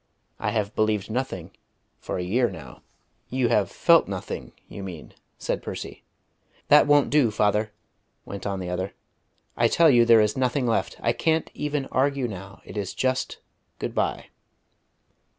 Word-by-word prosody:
I - - -1
have 105 -2 -1
believed 110 -1 0
nothing 110 -8 -3 0.5
for - - -4
a 90 - -2
year 120 +7 +1
now." 70 -5 -11 0.5
"You 125 -2 +1
have - - +2
felt - - +4
nothing, - - -5 0.2
you 100 - -8
mean," 90 -5 -8 0.2
said - - -2
Percy. - - -7 0.7
"That 150 0 +7
won't 145 -1 +4
do, 145 -5 +4
father," 105 0 +1 0.5
went 100 +1 -6
on 100 -1 -2
the 90 -1 -4
other. 95 +2 -3 0.6
"I 115 - +3
tell 165 +6 +5
you 120 -2 +6
there 115 -1 +6
is 105 -1 +2
nothing 130 0 0
left. 115 -2 0
I 115 - +2
can't 160 +6 0
even 150 -2 -2
argue 135 -1 +1
now. 100 -2 -9
It - - -9
is 100 -2 -3
just 130 0 -1 0.4
good - - -4
bye." - - -1
115 Hz, 160 wpm, -25 LUFS, 100-130 Hz, 0.7 s, That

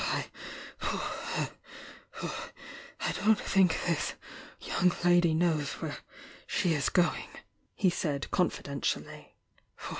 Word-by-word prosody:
"I - - -2 1.7
don't 215 +1 +5
think 185 -4 +3
this 170 -3 0 0.4
young 180 0 +2
lady 175 -2 +5
knows 160 -4 +2
where - - -4 0.5
she 175 - +2
is 145 -3 +1
going," 180 -2 +2 0.5
he 185 -3 +3
said, 145 -4 -2
confidentially. 140 -6 -1
175 Hz, 85 wpm, -31 LUFS, 150-180 Hz, 1.7 s, don't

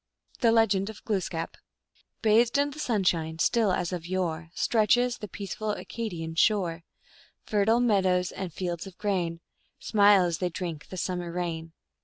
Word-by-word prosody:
1 235 - +4
THE - - +5
LEGEND 220 -3 +3
OF 220 - -11
GLOOSKAP. 180 -6 -2 0.7
Bathed 225 +3 +4
in 285 0 +2
the 300 - -10
sunshine 175 - 0
still 220 +4 +2
as 180 -1 -1
of 170 -1 -5
yore 175 -3 -2
Stretches 245 +2 +2
the 210 - -6
peaceful 205 +2 -4
Acadian 175 -9 -5
shore; 175 -2 +1 0.6
Fertile 215 +3 +2
meadows 190 -6 +2
and 190 -2 -5
fields 175 +1 -4
of 185 - -12
grain 175 -5 -1 0.4
Smile 205 -3 +5
as 170 -2 -1
they 180 - 0
drink 165 -3 -5
the 185 - -8
summer 180 -1 -3
rain. 165 -2 -4
190 Hz, 155 wpm, -27 LUFS, 170-215 Hz, 0.7 s, THE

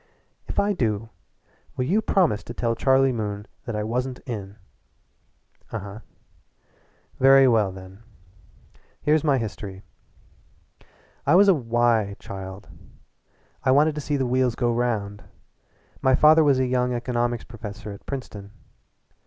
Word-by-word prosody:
"If - - -6
I 205 +1 +2
do, 115 - -1 0.7
will 125 - 0
you 200 +10 +2
promise 175 - +1
to 120 - -8
tell 115 -1 0
Charlie 135 +3 +3
Moon 105 -3 -4 0.2
that 120 -3 -4
I 105 - -2
wasn't 125 +3 -3
in?" 100 -5 -6 1.2
"Uh - - -6
uh." 105 0 -8 1.2
"Very 135 0 +7
well, 110 -5 +3
then. 95 +2 -12 1.0
Here's 150 0 +3
my 145 -4 +3
history: 105 -4 -6 1.4
I 150 - +5
was 200 +2 +6
a 195 - +7
'why' 115 - +1
child. 95 +1 -9 1.0
I 130 - +1
wanted 150 +4 +4
to 150 - -5
see 145 0 -1
the 135 - 0
wheels 125 -1 +1
go 120 -1 0
round. 110 -4 -2 0.8
My 130 0 +4
father 155 +3 +6
was 140 -3 +4
a 130 - +1
young 125 -1 0
economics 120 -1 -1
professor 105 -2 -8
at 100 - -12
Princeton. 105 -7 -6
120 Hz, 135 wpm, -24 LUFS, 105-135 Hz, 1.4 s, Very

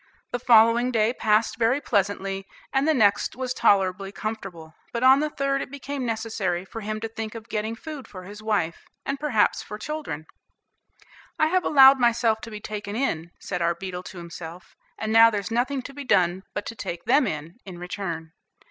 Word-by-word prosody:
The 245 - -2
following 235 +1 +5
day 225 0 +2
passed 220 -1 +1
very 235 +4 +3
pleasantly, 195 -5 -1 0.3
and 270 +2 +2
the 315 - +4
next 205 -4 +3
was 255 -1 -3
tolerably 195 -4 +2
comfortable; 195 -7 -6 0.2
but 235 +1 -2
on 265 +1 +7
the 305 +1 0
third 275 -1 -1
it - - -5
became 280 -1 -5
necessary 215 -6 -2
for 225 +4 -8
him 215 +1 -3
to 225 - -2
think 225 0 -6
of 225 0 -9
getting 220 +1 -2
food 300 +2 -8
for 185 -2 -10
his 205 +3 -10
wife, 200 -7 -1 0.2
and, 275 0 -2
perhaps, 275 -8 +2
for 210 - -8
children. 215 - -5 1.1
"I 310 - +3
have 365 +1 +2
allowed 270 -2 +7
myself 235 -2 +2
to - - -8
be 215 -1 -7
taken 210 -1 -6
in," 170 -10 -1
said 180 -2 -4
our 170 0 +1
beetle 180 0 -6
to 185 - -10
himself, 170 0 -9 0.2
"and 220 0 -2
now 225 0 +8
there's 205 -1 -3
nothing 255 +3 0
to 275 - -9
be 285 +1 -7
done 185 -5 +2
but 205 - -3
to 230 - -6
take 175 -5 -6
them 265 +1 +4
in, 155 +7 -5
in 185 -3 -9
return." 175 -3 -5
220 Hz, 195 wpm, -25 LUFS, 190-250 Hz, 1.1 s, now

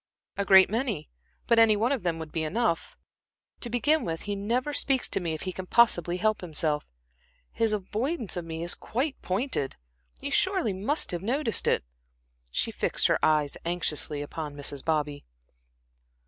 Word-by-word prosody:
"A 200 - 0
great 190 -1 +8
many, 220 - -2 0.3
but 235 -1 +4
any 225 -2 +6
one 225 +5 +1
of 270 -5 0
them 170 -2 -1
would 160 -1 -7
be 160 - -1
enough. 170 +2 -1 0.6
To 240 - -2
begin 295 +7 +2
with, 165 -1 -3
he 205 0 -3
never 240 +8 -1
speaks 270 -2 +2
to - - +1
me 170 -3 -2
if - - -7
he 185 - -3
can 185 +1 -7
possibly 180 -7 +3
help 215 +3 +1
himself. 155 -3 -1 0.6
His 225 -1 +1
avoidance 215 - -1
of 175 - -3
me 165 0 -5
is 175 - +1
quite 265 +5 -3
pointed 190 - -1 0.4
you - - -4
surely 375 - +2
must 210 +11 0
have 175 -1 -3
noticed 240 +3 0
it?" - - +2 0.7
She - - -1
fixed - - 0
her - - +1
eyes 150 -2 +2
anxiously 155 -3 +1
upon 150 0 -6
Mrs. 145 -1 -3
Bobby. 150 -2 -1
190 Hz, 170 wpm, -27 LUFS, 160-235 Hz, 0.7 s, great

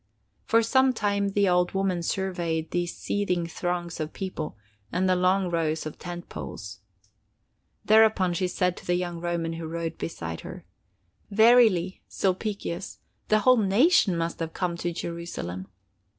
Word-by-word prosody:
For 230 0 +4
some 260 +3 +4
time 200 -3 0
the 200 -1 +3
old 180 0 +2
woman 190 -2 0
surveyed 170 -3 -2
these 175 -1 -2
seething 180 -4 -1
throngs 175 0 -3
of 155 0 -4
people 175 - -5 0.3
and 185 +1 +1
the 185 - +4
long 185 0 +2
rows 160 -2 0
of 155 - -7
tent 175 0 -7
poles. 100 -1 -8 1.1
Thereupon 215 -4 +5
she 180 +2 0
said 180 0 0
to - - -11
the 175 - +2
young 175 -1 -3
Roman 170 -1 -2
who 165 -1 -5
rode 165 0 -4
beside 85 - -5
her: - - -9 0.6
"Verily, 220 -4 +5
Sulpicius, 195 -1 -2 0.3
the 215 0 +3
whole 255 +3 +6
nation 210 - +4
must 165 0 -2
have 165 -1 -4
come 180 -2 -1
to 175 0 -2
Jerusalem." 165 - -5
180 Hz, 150 wpm, -26 LUFS, 170-200 Hz, 1.1 s, whole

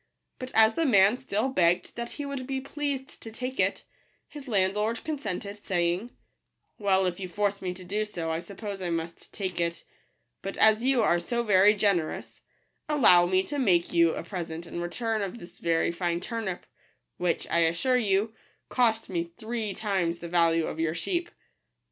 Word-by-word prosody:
But 255 -1 -5
as 220 0 +6
the 330 +3 +1
man 200 -2 +6
still 250 -1 -1
begged 175 -7 +2
that 235 0 -5
he 290 - -5
would 275 -2 -5
be 270 -1 -2
pleased 275 0 -4
to 225 - -8
take 255 +3 -5
it, - - +1 0.4
his 290 -2 -10
landlord 210 +1 0
consented, 205 - -4
saying, 175 +4 0 0.4
" - - -50
Well, 190 -2 +3
if 180 0 -2
you 185 -1 -5
force 200 +1 -1
me 185 -1 -2
to 185 - -10
do 205 +4 -1
so, 170 -6 -4
1 160 +1 -1
suppose 200 +1 -7
1 175 -2 -1
must 165 +1 -6
take 185 -4 -3
it; 170 0 -2 0.6
but 195 - -5
as 220 +1 +5
you 260 -3 +3
are 175 -4 +3
so 235 +8 -1
very 205 -1 +5
generous, 195 -6 -1 0.5
allow 185 -12 +6
me 185 +1 +2
to 290 +7 -4
make 180 -9 +2
you 170 -1 +4
a - - -4
present 170 -2 -5
in 170 - -5
return 220 +5 -2
of 200 +3 -4
this 175 -6 -13
very 165 0 +1
fine 170 0 -1
turnip, 215 -2 -4 0.5
which, 175 -1 0
I 170 - +3
assure 170 +10 +2
you, 210 -1 +1 0.4
cost 225 -3 +2
me 170 -2 -3
three 220 -3 -3
times 190 -6 0
the 170 - -7
value 165 -1 +3
of 160 - -5
your 165 0 0
sheep." 345 - -2
200 Hz, 185 wpm, -28 LUFS, 175-230 Hz, 0.6 s, as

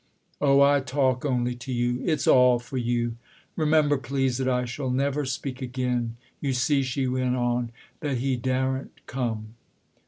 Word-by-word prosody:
" - - -40
Oh, 140 -1 +5
I 140 0 +5
talk 130 -1 0
only 125 -3 0
to 125 +2 -7
you: 120 +1 0
it's 160 -4 0
all 125 -1 +6
for 120 +2 -7
you. 120 -1 -1 0.4
Remem 155 -1 +3
ber, 145 -1 +2
please, 130 0 -1
that 130 - 0
I 125 -1 +1
shall 130 +2 -4
never 140 +3 0
speak 130 0 -4
again. 125 -2 -2 0.2
You 135 -2 -1
see," 135 +3 +2
she 130 +1 -1
went 130 0 0
on, 120 -1 0
" - - -32
that 145 -5 -1
he 130 +2 0
daren't 130 +1 -2
come." 110 -4 -3
130 Hz, 180 wpm, -26 LUFS, 120-135 Hz, 0.4 s, all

